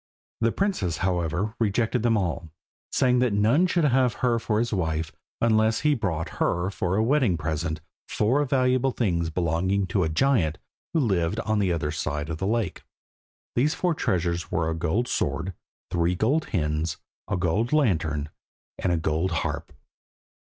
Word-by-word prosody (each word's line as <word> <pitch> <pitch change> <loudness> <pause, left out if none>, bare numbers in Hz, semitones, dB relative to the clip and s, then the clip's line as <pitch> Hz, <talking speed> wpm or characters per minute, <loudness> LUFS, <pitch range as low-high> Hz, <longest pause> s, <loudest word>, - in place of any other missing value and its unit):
The 115 0 +2
princess, 175 - -1
however, 90 +3 0
rejected 115 +2 +1
them 115 -1 +3
all, 85 -4 -2 0.4
saying 125 -1 +3
that 125 -4 +2
none 115 - +3
should 175 -1 +1
have 130 -4 +3
her 120 -2 +1
for 110 -1 -1
his 115 +1 0
wife 80 -4 -1 0.3
unless 110 -1 +3
he 150 -1 +3
brought 85 - -3
her 85 +3 +1
for 90 -1 -1
a 110 - +2
wedding 125 - +2
present 80 +1 -2 0.3
four 125 +8 +2
valuable 130 -1 +2
things 85 -10 0
belonging 90 +4 0
to 95 +1 0
a 80 - 0
giant 85 - +2 0.4
who 160 - +4
lived 95 -4 +1
on 110 -1 0
the 95 -3 +2
other 80 -3 -1
side 75 0 -3
of 80 - -4
the 95 - -1
lake. 110 -3 -1 0.7
These 145 +6 +2
four 180 -2 +1
treasures 85 - -1
were 80 0 0
a - - -1
gold 85 +9 0
sword, 80 - -1 0.4
three 85 +1 +1
gold 130 - +1
hens, 75 -3 -1 0.3
a - - -1
gold 95 +7 0
lantern, 80 - +1 0.5
and 90 - 0
a 85 - +2
gold 80 +3 0
harp. 85 -3 -3
95 Hz, 165 wpm, -26 LUFS, 80-120 Hz, 0.7 s, who